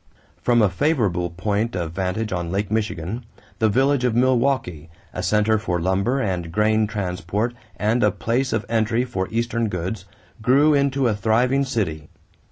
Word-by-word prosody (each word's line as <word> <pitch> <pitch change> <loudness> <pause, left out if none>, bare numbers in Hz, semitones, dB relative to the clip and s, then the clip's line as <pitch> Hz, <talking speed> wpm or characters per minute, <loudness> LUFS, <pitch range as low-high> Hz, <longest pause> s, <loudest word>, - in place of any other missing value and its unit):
From 120 -2 +3
a 105 - +4
favorable 95 - 0
point 100 +6 -2
of 85 -3 -3
vantage 95 +4 -2
on 85 -1 -3
Lake 100 +2 -2
Michigan, 110 0 -2 0.4
the 110 - +3
village 135 +4 +2
of 125 -3 +1
Milwaukee, 120 - +1 0.2
a 90 - -3
center 105 +2 +2
for 90 -5 -1
lumber 95 +9 +1
and 90 -8 -2
grain 110 +3 +2
transport 105 +3 -2 0.2
and 110 +5 +1
a 105 - +5
place 120 +6 -1
of 110 -1 -1
entry 115 +2 +1
for 95 -7 -3
Eastern 115 0 -1
goods, 90 +4 -4 0.4
grew 140 +7 +4
into 140 -2 +2
a 115 - +2
thriving 120 +6 +2
city. 95 - -3
110 Hz, 160 wpm, -22 LUFS, 95-120 Hz, 0.4 s, a